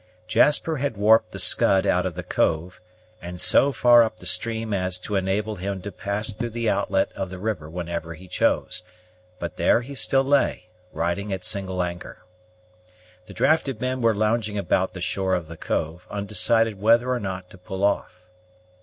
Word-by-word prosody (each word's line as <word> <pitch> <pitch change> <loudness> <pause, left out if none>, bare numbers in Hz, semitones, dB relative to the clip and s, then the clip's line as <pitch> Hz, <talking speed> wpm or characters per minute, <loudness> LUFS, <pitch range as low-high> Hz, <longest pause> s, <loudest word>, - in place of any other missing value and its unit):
Jasper 150 +7 +3
had 135 -5 -2
warped 110 +2 +4
the - - -8
Scud 95 -1 +3
out - - +2
of - - -6
the - - -5
cove, 85 +4 -1 0.4
and 90 0 -7
so 140 - +4
far 120 -2 +6
up 110 -1 0
the 90 - -13
stream 110 +4 -2
as 90 -2 -1
to 100 +3 -5
enable 100 +3 -1
him 95 +1 -4
to 100 - -5
pass 100 +3 -2
through 120 +3 -4
the 115 0 -3
outlet 100 -2 +1
of 95 -2 -4
the 95 - -7
river 90 -6 -3
whenever 85 -1 -5
he 90 +3 -14
chose; - - 0 0.6
but 85 -2 -6
there - - +3
he 135 +4 -9
still 135 0 +2
lay, 140 -6 +1 0.3
riding 85 +5 -2
at 95 -1 -3
single 95 -1 -1
anchor. 90 +1 -7 1.0
The 100 - -10
drafted 135 - +1
men 130 +1 -2
were 115 -2 +3
lounging 110 0 0
about 95 -1 0
the 90 - -6
shore 95 +1 0
of 85 -3 -4
the 85 - -9
cove, 80 +2 -3
undecided 105 +1 +1
whether 115 +3 +4
or 125 - 0
not 95 -3 -6
to 95 - -13
pull 95 0 -6
off. 95 -2 -1
100 Hz, 180 wpm, -24 LUFS, 90-115 Hz, 1.0 s, far